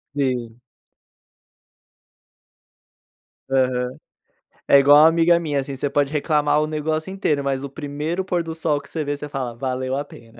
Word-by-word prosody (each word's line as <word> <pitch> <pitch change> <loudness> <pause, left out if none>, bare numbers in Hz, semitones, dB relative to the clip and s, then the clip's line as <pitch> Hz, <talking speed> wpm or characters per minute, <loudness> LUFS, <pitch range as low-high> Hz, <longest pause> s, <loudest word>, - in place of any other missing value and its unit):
Sim. 125 -4 -2 2.9
Aham. 130 -1 0 0.7
É 140 - +7
igual 145 +1 +7
uma - - +8
amiga 170 +1 +4
minha, 150 -4 -1
assim, 135 0 -5
você 140 +2 -2
pode 140 0 0
reclamar 150 0 +2
o 155 - -1
negócio 155 +3 -2
inteiro, 155 -7 -1
mas 135 -1 -2
o - - -7
primeiro 150 +5 -4
pôr 180 -2 -1
do 165 -1 -6
sol 155 -3 0
que 140 - -15
você 160 - -3
vê, 145 0 -2
você 150 - -7
fala: 135 -4 -4
"Valeu 130 +1 -3
a 145 +1 -3
pena." 115 -4 -16
145 Hz, 160 wpm, -22 LUFS, 135-155 Hz, 2.9 s, uma